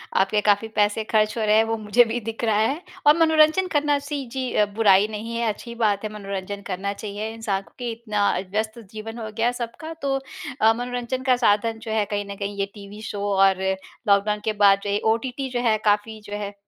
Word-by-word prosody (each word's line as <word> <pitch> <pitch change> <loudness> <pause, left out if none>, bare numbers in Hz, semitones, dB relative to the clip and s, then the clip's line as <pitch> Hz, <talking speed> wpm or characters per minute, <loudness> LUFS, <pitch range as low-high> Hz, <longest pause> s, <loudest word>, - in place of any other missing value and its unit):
आपके 195 +2 +3
काफ़ी 205 +1 +2
पैसे 210 +1 +2
ख़र्च 215 +1 +1
हो 220 - 0
रहे 210 0 +4
हैं, 220 - +5
वो 225 0 -2
मुझे 215 +3 +4
भी 230 +2 -2
दिख 225 +2 -6
रहा 220 -2 +2
है। 270 +10 +1 0.3
और 300 +2 +7
मनोरंजन 320 +3 +4
करना 295 -3 +2
सी 285 -1 -4
जी 260 -1 -3
अ, 210 - +4
बुराई 205 -2 +5
नहीं 220 +2 -5
है, 235 - 0
अच्छी 235 +3 -6
बात 215 -3 +1
है, 215 - -2
मनोरंजन 200 -1 -5
करना 195 +1 -2
चाहिए। 210 +1 -5
इंसानों 205 -4 -3
के 245 -1 -3
इतना 215 -3 0 0.2
व्यस्त 220 +2 -2
जीवन 220 +1 -7
हो 220 -1 -5
गया 235 +2 +2
सबका। 245 +7 -6
तो 275 -1 0 0.5
अ, 220 +1 +6
मनोरंजन 245 +2 -3
का 255 - +6
साधन 225 -1 +2
जो 220 - -5
है 220 -1 +1
कहीं 205 0 -1
न - - -6
कहीं 200 0 -4
ये 200 - +2
टीवी 205 0 -11
शो 210 -2 -5
और 190 -1 +4 0.5
लॉकडाउन 205 +1 +3
के 220 - +1
बाद 200 -1 +5
ये 205 0 0
ओटीटी 260 +3 -4
जो 250 -1 -2
है 225 -3 +3
काफ़ी 210 +1 +1
जो 205 - -8
है 205 -1 -3
अ, - - -14
220 Hz, 220 wpm, -23 LUFS, 205-240 Hz, 0.5 s, और